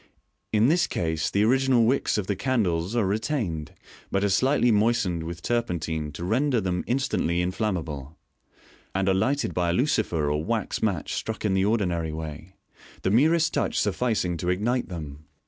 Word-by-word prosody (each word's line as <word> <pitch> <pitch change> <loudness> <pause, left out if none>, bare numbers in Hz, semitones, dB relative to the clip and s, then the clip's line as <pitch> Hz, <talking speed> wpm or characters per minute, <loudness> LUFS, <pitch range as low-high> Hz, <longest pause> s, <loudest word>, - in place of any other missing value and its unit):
In 110 +2 +4
this 175 +4 +3
case 80 -2 -1
the 100 - +2
original 130 0 +3
wicks 130 0 +1
of 105 - -1
the 100 - -1
candles 95 -5 0
are 115 -4 +2
retained, 100 - -2 0.4
but 95 - 0
are 100 - +2
slightly 125 +4 +3
moistened 105 -5 +2
with 85 +1 -7
turpentine 85 -10 -1
to 85 - -6
render 125 +7 +1
them 90 -3 -1
instantly 120 -9 0
inflammable, 85 -6 -3 0.8
and 95 0 +1
are 95 - +4
lighted 130 +9 0
by 90 -1 0
a - - +1
lucifer 95 - +1
or 75 +1 -1
wax 115 +2 -2
match 95 -8 -1
struck 110 0 -4
in 100 - +2
the 95 0 +2
ordinary 90 -7 0
way, 80 +3 -7 0.5
the 95 - +1
merest 160 +7 +3
touch - - 0
sufficing 105 -4 0
to 90 +2 -2
ignite 115 +8 0
them. 75 -4 -7
95 Hz, 165 wpm, -26 LUFS, 85-120 Hz, 0.8 s, In